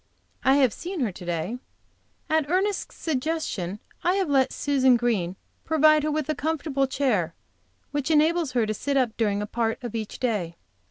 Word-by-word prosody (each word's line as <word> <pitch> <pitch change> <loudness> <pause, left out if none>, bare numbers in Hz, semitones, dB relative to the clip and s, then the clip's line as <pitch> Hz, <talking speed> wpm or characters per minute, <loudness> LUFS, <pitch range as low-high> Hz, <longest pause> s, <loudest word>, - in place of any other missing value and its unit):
I 265 - +5
have 265 -5 +4
seen 360 -2 -5
her 230 -5 +1
to 180 0 -10
day. 175 +8 -2 0.7
At 315 -2 +1
Ernest's 385 +3 0
suggestion 270 - -2 0.3
I 360 +2 +3
have 380 -6 0
let 265 -2 +3
Susan 265 -3 +3
Green 210 -7 0 0.3
provide 310 -1 +5
her 305 - -1
with 305 -2 -1
a 310 - +1
comfortable 295 -3 -1
chair 220 - 0 0.6
which 290 0 -2
enables 315 -1 +3
her 240 -3 +2
to 215 - -1
sit 280 +6 -1
up 245 -4 +1
during 210 -2 0
a - - -2
part 225 +1 -1
of 240 - -5
each 220 -2 -4
day. 205 -9 -1
265 Hz, 175 wpm, -25 LUFS, 220-310 Hz, 0.7 s, I